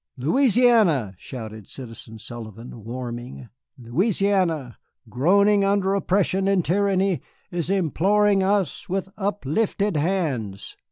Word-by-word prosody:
"Louisiana!" 210 Hz, -, +3 dB
shouted 110 Hz, -5 st, -8 dB
Citizen 115 Hz, -3 st, -9 dB
Sullivan, 115 Hz, 0 st, -9 dB
warming, 120 Hz, +1 st, -7 dB, 0.3 s
"Louisiana, 170 Hz, -, 0 dB, 0.3 s
groaning 200 Hz, -, +3 dB
under 195 Hz, -1 st, +2 dB
oppression 195 Hz, 0 st, +1 dB
and 195 Hz, -3 st, +2 dB
tyranny, 195 Hz, 0 st, +1 dB, 0.3 s
is 175 Hz, -1 st, -3 dB
imploring 195 Hz, +3 st, +2 dB
us 195 Hz, -4 st, 0 dB
with 190 Hz, +1 st, -2 dB
uplifted 205 Hz, 0 st, -1 dB
hands. 145 Hz, -, -2 dB
180 Hz, 95 wpm, -23 LUFS, 125-200 Hz, 0.3 s, Louisiana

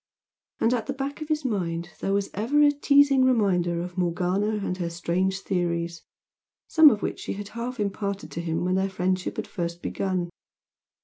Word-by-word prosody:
And 230 Hz, -, +3 dB
at 235 Hz, -3 st, -1 dB
the 275 Hz, -, -1 dB
back 275 Hz, +2 st, -4 dB
of 310 Hz, -, -4 dB
his 305 Hz, -2 st, -1 dB
mind 175 Hz, -6 st, -2 dB
there 195 Hz, -, -1 dB
was 200 Hz, 0 st, 0 dB
ever 235 Hz, +9 st, +1 dB
a 290 Hz, -, +6 dB
teasing 280 Hz, -2 st, +4 dB
reminder 190 Hz, -9 st, +2 dB
of 180 Hz, +1 st, -6 dB
Morgana 180 Hz, +3 st, 0 dB, 0.2 s
and 180 Hz, -, -1 dB
her 170 Hz, -1 st, -1 dB
strange 185 Hz, +3 st, -1 dB
theories, 170 Hz, -3 st, -2 dB, 0.7 s
some 315 Hz, -2 st, +8 dB
of 210 Hz, -6 st, -1 dB
which -, -, -2 dB
she -, -, -4 dB
had 205 Hz, 0 st, -7 dB
half 235 Hz, +1 st, -5 dB
imparted 200 Hz, -4 st, -3 dB
to 165 Hz, -, -4 dB
him 165 Hz, +1 st, -2 dB
when 185 Hz, -, +1 dB
their 190 Hz, +1 st, +1 dB
friendship 185 Hz, 0 st, -1 dB
had 220 Hz, -, -2 dB
first 170 Hz, -2 st, -4 dB
begun. 185 Hz, -3 st, -2 dB
190 Hz, 185 wpm, -26 LUFS, 175-235 Hz, 0.7 s, some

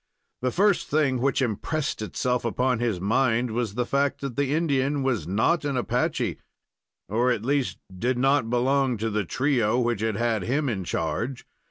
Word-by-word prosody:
The 130 Hz, -, +1 dB
first 195 Hz, +6 st, +2 dB
thing 140 Hz, -4 st, +1 dB
which 135 Hz, 0 st, +2 dB
impressed 135 Hz, +5 st, -2 dB
itself 125 Hz, +5 st, -1 dB
upon 125 Hz, +1 st, 0 dB
his 115 Hz, -6 st, 0 dB
mind 115 Hz, +3 st, +1 dB
was 110 Hz, -3 st, -2 dB
the 125 Hz, 0 st, 0 dB
fact 140 Hz, +2 st, 0 dB
that 135 Hz, -4 st, -4 dB
the 140 Hz, 0 st, 0 dB
Indian 145 Hz, -3 st, +1 dB
was 120 Hz, -, -1 dB
not 110 Hz, -, +2 dB
an 140 Hz, -3 st, -1 dB
Apache, 125 Hz, 0 st, -1 dB, 0.7 s
or 120 Hz, +6 st, +1 dB
at 115 Hz, -3 st, -1 dB
least, 140 Hz, -1 st, 0 dB, 0.2 s
did 120 Hz, +7 st, 0 dB
not 135 Hz, -2 st, +2 dB
belong 130 Hz, +1 st, +2 dB
to 110 Hz, +1 st, -2 dB
the 105 Hz, -1 st, -1 dB
trio 125 Hz, -, +1 dB
which 120 Hz, -4 st, 0 dB
had 110 Hz, -2 st, 0 dB
had 115 Hz, -1 st, 0 dB
him 140 Hz, +8 st, 0 dB
in 100 Hz, -5 st, -2 dB
charge. 115 Hz, +11 st, -2 dB
125 Hz, 175 wpm, -25 LUFS, 115-140 Hz, 0.7 s, first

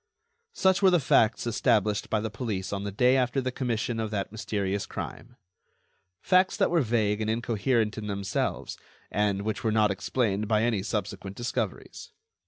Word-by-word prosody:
Such 190 Hz, -, +2 dB
were 195 Hz, -, +6 dB
the 180 Hz, -2 st, +4 dB
facts 115 Hz, -5 st, +3 dB
established 110 Hz, -3 st, +1 dB
by 110 Hz, -, +1 dB
the 110 Hz, 0 st, -3 dB
police 100 Hz, -3 st, -3 dB
on 100 Hz, 0 st, -3 dB
the 100 Hz, -, -3 dB
day 125 Hz, +6 st, +3 dB
after 125 Hz, 0 st, +1 dB
the 130 Hz, -1 st, -2 dB
commission 120 Hz, -2 st, -2 dB
of 110 Hz, -1 st, -2 dB
that 100 Hz, -2 st, -3 dB
mysterious 100 Hz, -3 st, -2 dB
crime. 120 Hz, +2 st, -7 dB, 0.9 s
Facts 185 Hz, 0 st, +3 dB
that 195 Hz, -5 st, +2 dB
were 170 Hz, -2 st, +3 dB
vague 110 Hz, -3 st, +1 dB
and 110 Hz, -, -1 dB
incoherent 115 Hz, 0 st, 0 dB
in 105 Hz, -, -6 dB
themselves, 100 Hz, -1 st, -2 dB, 0.3 s
and 100 Hz, -1 st, 0 dB
which 110 Hz, 0 st, -3 dB
were 110 Hz, -, +1 dB
not 105 Hz, -1 st, +3 dB
explained 105 Hz, +1 st, -1 dB
by 110 Hz, 0 st, +2 dB
any 115 Hz, -4 st, +1 dB
subsequent 100 Hz, -2 st, -4 dB
discoveries. 120 Hz, 0 st, -4 dB
110 Hz, 170 wpm, -27 LUFS, 100-125 Hz, 0.9 s, were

